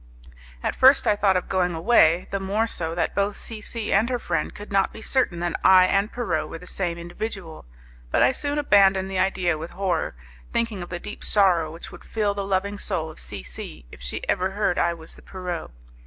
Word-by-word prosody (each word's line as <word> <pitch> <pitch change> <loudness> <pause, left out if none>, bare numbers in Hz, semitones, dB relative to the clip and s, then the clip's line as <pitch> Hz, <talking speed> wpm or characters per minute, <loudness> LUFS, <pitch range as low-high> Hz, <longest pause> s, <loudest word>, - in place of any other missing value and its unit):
At - - 0
first 265 +1 +6
I 210 - +4
thought 195 -2 +3
of 180 - -3
going 180 -2 0
away, 170 -2 +4
the 195 - -1
more 200 +4 0
so 165 -7 -4
that 175 - -1
both 200 0 0
C 220 -2 -5
C 220 +1 -2
and 215 +5 +3
her 250 - 0
friend 165 -8 -2
could 205 0 -10
not 195 -1 +2
be - - -10
certain 220 -7 0
that 175 -1 -2
I 185 -1 +7
and 195 +3 +1
Pierrot 240 -1 -2
were - - -6
the 180 - -13
same 175 -2 -2
individual, 175 - -6 0.4
but - - +3
I - - +5
soon 285 +2 -2
abandoned 195 -8 +4
the 190 - -1
idea 185 -4 +1
with 165 +2 -6
horror, 190 - -1 0.4
thinking 230 -5 -1
of 175 - -7
the 175 - -4
deep 210 - -8
sorrow 180 -6 +4
which 165 +2 -10
would - - -12
fill 210 -2 -1
the 200 0 -3
loving 200 +1 -1
soul 165 -7 -2
of - - -12
C - - -6
C - - -8
if - - -13
she 60 - -5
ever 185 +1 +1
heard 195 -2 0
I 170 0 +1
was 160 -1 -11
the - - -16
Pierrot. 180 -3 -5
190 Hz, 220 wpm, -24 LUFS, 175-210 Hz, 0.4 s, I